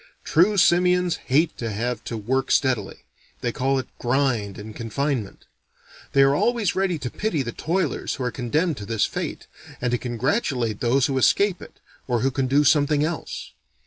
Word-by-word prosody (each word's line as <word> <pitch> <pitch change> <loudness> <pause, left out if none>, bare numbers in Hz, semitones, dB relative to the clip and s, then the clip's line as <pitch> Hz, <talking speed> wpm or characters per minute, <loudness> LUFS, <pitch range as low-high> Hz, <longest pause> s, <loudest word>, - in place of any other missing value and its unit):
True 195 +6 +3
simians 180 -1 +3
hate 150 +5 +2
to 115 - -3
have 115 +2 -3
to 115 - -4
work 130 +5 -1
steadily: 125 -7 0 0.4
they 120 - -1
call 135 +3 0
it 130 - -3
grind 120 -6 0
and 105 +1 -9
confinement. 120 -1 -3 0.7
They 140 - +6
are 135 0 +4
always 230 +4 +1
ready 190 -3 0
to 125 -4 -5
pity 175 -10 -1
the 120 - -4
toilers 175 +9 -2
who 130 - -5
are 125 - -1
condemned 150 +7 -1
to 100 - -7
this 110 -2 +1
fate, - - -5 0.3
and 125 -1 -1
to 120 - 0
congratulate 125 - -1
those 125 +2 +2
who 135 -2 0
escape 200 +7 +3
it, - - -13 0.3
or 120 -3 0
who 135 - +1
can 130 0 -1
do 140 +3 +3
something 145 0 +3
else. 160 +1 -4
135 Hz, 175 wpm, -23 LUFS, 120-160 Hz, 0.7 s, They